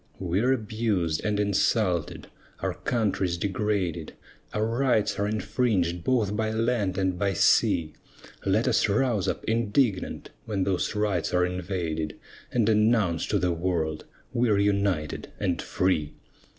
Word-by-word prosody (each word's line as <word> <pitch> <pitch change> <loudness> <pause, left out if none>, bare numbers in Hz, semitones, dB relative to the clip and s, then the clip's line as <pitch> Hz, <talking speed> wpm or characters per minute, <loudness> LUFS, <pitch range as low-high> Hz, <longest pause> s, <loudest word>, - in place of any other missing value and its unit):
We're 95 +8 +1
abused 105 -9 -1
and 105 -1 0
insulted, 100 -3 +1 0.4
our - - -1
country's 100 -7 -1
degraded, 100 -2 -2 0.4
Our 105 +1 0
rights 115 -3 +1
are 100 - +1
infringed 105 -5 0
both 110 -4 +1
by 110 0 0
land 110 -4 0
and 95 -2 0
by 100 -1 +1
sea; 80 -2 +3 0.5
Let 105 +6 +1
us 115 -3 +2
rouse 110 -2 +1
up, - - -2
indignant, 110 -2 0
when 105 -4 -1
those 95 +2 -1
rights 105 -6 0
are 90 0 +4
invaded, 85 -4 -3 0.3
And 115 -4 +2
announce 105 -6 +2
to 105 - +1
the 90 -2 +1
world, 85 -3 -2 0.3
"We're 115 -4 +2
united 100 -6 0
and 90 -4 0
free!" 90 -6 0
100 Hz, 130 wpm, -26 LUFS, 90-110 Hz, 0.5 s, are